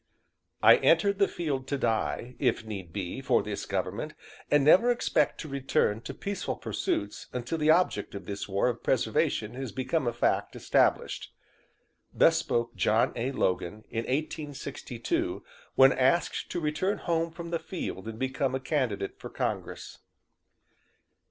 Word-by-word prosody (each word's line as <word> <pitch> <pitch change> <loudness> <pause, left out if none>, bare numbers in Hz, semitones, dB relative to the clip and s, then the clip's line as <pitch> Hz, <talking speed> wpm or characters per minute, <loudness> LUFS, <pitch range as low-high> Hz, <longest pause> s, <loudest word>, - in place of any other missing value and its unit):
"I - - +9
entered 200 -1 +3
the 200 - +5
field 140 -6 -3
to 140 - -1
die, 120 0 -1
if 110 - +1
need 95 -6 -6
be, 95 -2 -4
for - - +2
this - - -5
government - - -3 0.3
and 145 -1 +4
never 190 +10 +6
expect 195 -10 +1
to 155 - -7
return 135 -6 0
to - - -6
peaceful 200 -1 -3
pursuits 100 0 -3
until 125 +6 -3
the 155 0 +2
object 155 - +2
of 100 -2 -7
this 100 +1 -5
war 100 +4 +2
of 120 -2 -2
preservation 110 -2 +1
has 130 -2 -5
become 130 +4 -1
a - - +2
fact 120 - 0
established." - - +1 0.8
Thus - - +5
spoke 120 0 -1
John 105 +4 +2
A. 125 +3 -1
Logan 100 -3 -1
in 115 0 -2
1862, 140 -4 -3 0.3
when 135 0 +7
asked 135 +7 +1
to 175 - -2
return 165 +6 0
home 165 -1 0
from 170 0 -8
the 170 - 0
field 110 - -5
and 110 -1 -6
become 130 +1 -1
a - - -1
candidate 125 -8 -2
for - - -7
Congress. - - -4
130 Hz, 150 wpm, -29 LUFS, 110-155 Hz, 0.8 s, I